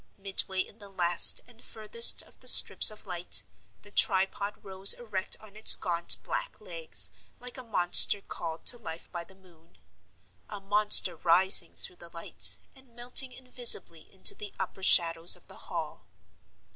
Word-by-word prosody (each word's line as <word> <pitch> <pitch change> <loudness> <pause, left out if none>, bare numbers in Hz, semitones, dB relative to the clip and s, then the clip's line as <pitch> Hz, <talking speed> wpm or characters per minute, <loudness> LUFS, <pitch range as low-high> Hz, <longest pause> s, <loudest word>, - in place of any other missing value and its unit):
Midway 190 -1 -3
in 210 - -13
the 200 -1 -15
last 175 -3 +1
and 240 -1 -15
furthest 225 - +1
of - - -27
the - - -12
strips - - +8
of 215 0 -15
light, 180 -2 -1 0.4
the 205 - -16
tripod 200 +1 -3
rose 195 -1 +2
erect 210 -6 -8
on 215 -2 -20
its 215 - +3
gaunt 170 -1 -3
black - - -9
legs, - - -4 0.3
like 250 0 -10
a 260 - -11
monster 205 -2 +3
called 165 -4 -11
to 240 - +3
life 170 -7 -12
by 175 -2 -9
the 190 - -20
moon—a 185 +3 -21
monster 200 -3 +3
rising 180 +4 +1
through 180 - -8
the 170 - -13
light, 165 0 0 0.2
and 260 -3 -21
melting 250 +2 0
invisibly 245 -10 0
into 190 - 0
the 205 -1 -13
upper 190 0 -9
shadows 165 -2 +2
of - - -20
the - - -14
Hall. - - -10
195 Hz, 160 wpm, -25 LUFS, 175-225 Hz, 0.4 s, strips